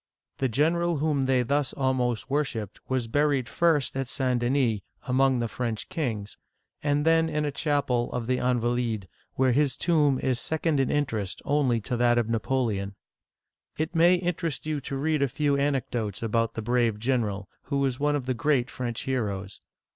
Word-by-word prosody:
The 135 - +1
general 165 +6 +1
whom 145 -2 +1
they 130 -2 +3
thus 140 +2 0
almost 130 -4 0
worshiped 130 -8 -2
was 130 -3 0
buried 140 0 +1
first 150 -3 +1
at 135 -1 -2
St. 130 -2 0
Denis, 120 -3 +1 0.2
among 130 0 +2
the 120 -1 -1
French 115 -1 -4
kings, 115 - -3 0.4
and 145 0 +1
then 165 0 +4
in 150 -1 -1
a 145 - -1
chapel 140 -5 0
of 125 -2 -3
the 125 +2 +1
Invalides 125 - 0
(aN - - 0
va 120 - 0
leed'), 115 -5 -1 0.3
where 130 -1 +3
his 140 +2 +2
tomb 150 -6 +3
is 130 -2 0
second 160 +2 0
in 135 - +2
interest 115 -10 -1
only 140 -5 +2
to 120 - -3
that 120 0 +3
of 115 -2 +1
Napoleon. 110 -4 -1 0.8
It 160 +2 -2
may 170 +2 +5
interest 170 -5 -2
you 155 -2 -2
to 135 +1 -4
read 155 +1 0
a 140 - +3
few 145 +2 0
anecdotes 125 -7 -1
about 115 0 0
the 110 - -4
brave 120 -2 +1
general, 105 -4 -1 0.2
who 140 -1 0
is 130 -2 -2
one 145 0 +2
of 140 -4 -2
the 130 - 0
great 125 -2 +1
French 120 -2 -4
heroes. 100 -7 -3
130 Hz, 185 wpm, -27 LUFS, 120-145 Hz, 0.8 s, may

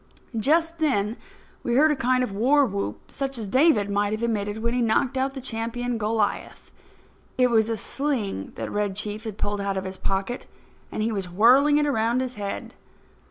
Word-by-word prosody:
Just 325 +8 +2
then 225 -8 +1 0.5
we 240 - -1
heard 305 +4 +5
a - - +2
kind 255 0 +2
Of 250 - -3
war 265 +8 +3
whoop, 100 - -4
such 270 -1 -3
as 220 -3 -4
David 255 -3 +4
might 205 +1 0
have 215 +2 -3
emitted 210 -2 -1
when 235 0 0
he 250 - +1
knocked 235 +3 +1
out 265 +1 -1
the 265 - -5
champion 240 0 -2
Goliath. 215 -1 -2 0.7
It 250 -1 +4
was 220 -1 +3
a 225 - -1
sling 225 - -2
that - - -5
Red 205 -2 -1
Chief 210 +2 -4
had 215 -2 -5
pulled 205 -1 -2
out 200 -1 -1
of 190 - -2
his 190 0 -6
pocket, 195 +6 -2 0.4
and 215 - -2
he 225 - 0
was 195 -4 -3
whirling 255 +10 +5
it 295 - +2
around 235 -3 +1
his 255 -1 -2
head. 200 -2 -5
230 Hz, 195 wpm, -25 LUFS, 205-260 Hz, 0.7 s, heard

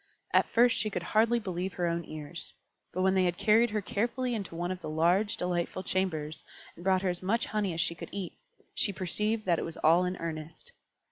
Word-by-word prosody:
At - - +5
first 235 +1 +4
she 215 - 0
could 180 -4 -3
hardly 225 +5 +3
believe 185 -4 -3
her 175 - -1
own 170 0 0
ears; 155 +2 -7 0.4
but 185 - -1
when 190 0 +4
they 190 -1 +3
had 175 -1 0
carried 225 +3 +4
her 210 -1 -2
carefully 245 +5 -1
into 200 -6 -4
one 175 +2 -2
of 185 -1 -5
the - - -5
large, 175 +7 +2
delightful 180 +1 -1
chambers, 160 -5 -1 0.3
and 170 - -12
brought 190 0 +3
her 190 - +2
as 175 0 -3
much 220 +6 +1
honey 210 -3 -1
as 165 0 -1
she - - 0
could 170 - -9
eat, 195 -3 -4 0.4
she 205 - +2
perceived 210 +4 -1
that 175 -3 +2
it - - -2
was 165 - -5
all 165 +3 +5
in 180 0 -2
earnest. 165 - -6
185 Hz, 220 wpm, -30 LUFS, 170-210 Hz, 0.4 s, At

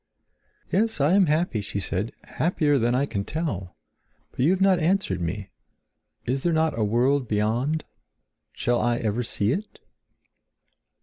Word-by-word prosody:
"Yes, 220 -1 +1
I 145 +5 +3
am 195 -2 +5
happy," 155 -7 +1
she 100 0 -4
said, 100 +3 -2
"happier 150 -4 +1
than 120 +1 +2
I 135 +2 +2
can 100 -8 -3
tell. 100 - -4 0.6
But - - -20
you 135 +6 +4
have 185 0 +2
not 190 -2 +4
answered 165 - +1
me. 95 +3 -4 0.7
Is 130 +2 -1
there 175 - +1
not 160 0 +2
a 115 - 0
world 125 +5 +2
beyond? 115 +9 0 0.7
Shall 120 0 0
I 120 -1 +1
ever 115 0 -1
see 105 -2 0
it?" 205 +9 -4
130 Hz, 150 wpm, -25 LUFS, 105-160 Hz, 0.7 s, am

